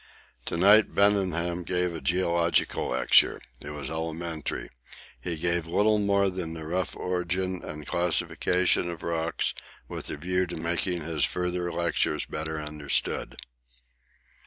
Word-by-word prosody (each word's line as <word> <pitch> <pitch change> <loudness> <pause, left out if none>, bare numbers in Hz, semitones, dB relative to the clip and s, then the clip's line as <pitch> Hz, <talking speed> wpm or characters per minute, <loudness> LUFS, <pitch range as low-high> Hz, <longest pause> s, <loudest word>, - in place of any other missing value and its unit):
To - - -3
night 100 +4 +6
Debenham 90 -4 +2
gave 90 0 0
a 80 - -5
geological 85 -1 +1
lecture. 65 - +4 0.2
It 70 - -8
was 75 -1 -5
elementary. 80 0 -4 0.5
He 85 - -2
gave 85 0 0
little 105 +5 +3
more 100 -1 +2
than 85 -3 -4
the 80 -1 -7
rough 90 +2 -2
origin 90 +1 -2
and 75 -1 -7
classification 90 +2 +1
of 85 -2 -6
rocks 85 -1 -1 0.3
with - - -6
a - - -3
view 90 +4 0
to - - -6
making 85 +1 -1
his 80 -2 0
further 90 -1 0
lectures 85 -2 0
better 80 0 -4
understood. 75 -1 -2
85 Hz, 135 wpm, -27 LUFS, 80-90 Hz, 0.5 s, night